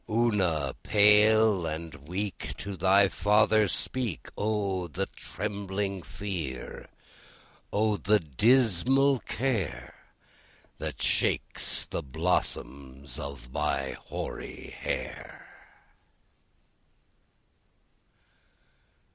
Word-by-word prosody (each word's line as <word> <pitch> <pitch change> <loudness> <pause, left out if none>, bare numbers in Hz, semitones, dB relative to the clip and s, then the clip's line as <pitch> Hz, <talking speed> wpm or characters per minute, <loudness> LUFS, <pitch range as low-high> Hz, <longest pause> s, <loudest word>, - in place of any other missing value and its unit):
Ona, 95 - +1
pale 105 -2 +5
and 80 0 -5
weak, 100 +3 -4
To 100 -1 -5
thy 95 +2 +5
father 105 +2 +3
speak! 105 - -1
O 100 -4 -1
the 95 +4 -2
trembling 100 -2 -4
fear! 85 -11 -5 0.8
O 105 0 +2
the 105 +2 +3
dismal 125 - +3
care 100 - -2 0.9
That - - -4
shakes - - 0
the - - -4
blossoms 70 -3 -2
of 70 -4 -7
my 70 -2 -1
hoary - - -7
hair! - - -5
100 Hz, 75 wpm, -28 LUFS, 80-105 Hz, 0.9 s, pale